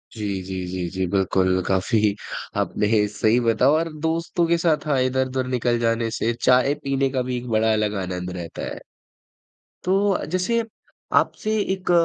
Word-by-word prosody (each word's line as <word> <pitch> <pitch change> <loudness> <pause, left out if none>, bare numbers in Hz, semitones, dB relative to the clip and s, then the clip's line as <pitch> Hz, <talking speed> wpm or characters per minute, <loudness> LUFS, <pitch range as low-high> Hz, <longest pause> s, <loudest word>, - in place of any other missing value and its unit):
जी, 105 -2 -4 0.2
जी, 95 -1 -4
जी, 90 -1 -3
जी, 95 +1 -2
बिल्कुल 95 -1 +1
काफ़ी 100 +2 +2 0.4
आपने 105 0 +1
सही 110 +3 +2
बता 115 +2 +3
और 165 +2 +1
दोस्तों 165 +1 0
के 170 0 +3
साथ 165 -3 +1
हाँ, 140 -3 +2
इधर-उधर 130 0 0
निकल 120 -2 0
जाने 115 0 +1
से, 115 +1 0
चाय 130 +3 +4
पीने 135 0 +1
का 130 -1 -1
भी 125 0 -2
एक 120 - -6
बड़ा 110 0 +2
अलग 105 -1 0
आनंद 90 0 -4
रहता 85 -1 -7
है। - - -8 1.0
तो 195 +2 +1
जैसे 230 +6 +1 0.6
आपसे 215 - -2 0.2
एक 185 -1 -2
120 Hz, 160 wpm, -23 LUFS, 105-140 Hz, 1.0 s, चाय